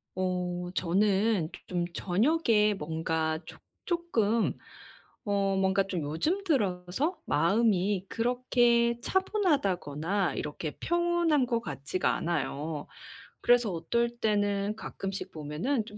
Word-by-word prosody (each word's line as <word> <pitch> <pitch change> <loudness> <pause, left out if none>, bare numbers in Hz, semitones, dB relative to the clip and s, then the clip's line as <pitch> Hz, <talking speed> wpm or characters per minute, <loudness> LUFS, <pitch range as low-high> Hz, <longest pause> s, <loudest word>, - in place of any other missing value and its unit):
어 180 -1 -2
저는 195 0 +2
조 - - -9
좀 175 -1 -1
저녁에 215 - +2
뭔가 160 -2 -1
조 - - -11 0.3
쪼끔 235 - +1 0.7
어 200 -1 +1
뭔가 190 +1 +3
좀 185 -4 -2
요즘 230 - -1
들어서 210 - 0
마음이 195 +3 +2
그렇게 235 0 +2
차분하다거나 200 - 0
이렇게 150 +1 -4
평온한 345 -5 +2
것 235 -2 0
같지가 150 -4 -1
않아요. 155 -2 -2 0.5
그래서 240 -3 +4
어떨 235 +8 0
때는 205 -1 +1
가끔씩 195 -3 -5
보면은 165 - -2
좀 210 -1 -11
200 Hz, 230 characters per minute, -29 LUFS, 175-240 Hz, 0.7 s, 그래서